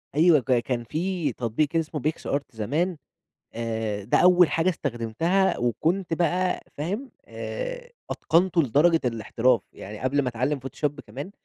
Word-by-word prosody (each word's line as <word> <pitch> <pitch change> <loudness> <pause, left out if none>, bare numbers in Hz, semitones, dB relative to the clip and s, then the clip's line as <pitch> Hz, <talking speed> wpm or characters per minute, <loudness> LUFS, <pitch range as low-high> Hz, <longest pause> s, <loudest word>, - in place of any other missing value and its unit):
أيوه 160 0 +6
ك 130 0 -4
كان 120 0 -2
في 165 - -2
تطبيق 125 +8 -1
اسمه 160 -2 -1
PicsArt 145 -1 -1
زمان، 150 - -1 0.6
آآ، 110 -3 -3
ده 105 - +2
أول 180 -1 +6
حاجة 165 +3 +2
استخدمتها، 155 - 0
وكنت 165 - 0
بقى 180 +2 +1 0.2
فاهم، 200 - -3
آآ، - - -6 0.2
أتقنته 170 -1 +2
لدرجة 160 +6 +4
الاحتراف، 115 0 +1
يعني 105 +2 -9
قبل 140 +3 +1
ما 130 - -1
أتعلم 130 +5 -1
Photoshop 135 +2 -2 0.2
كمان، 140 - -7
150 Hz, 135 wpm, -25 LUFS, 120-175 Hz, 0.6 s, أيوه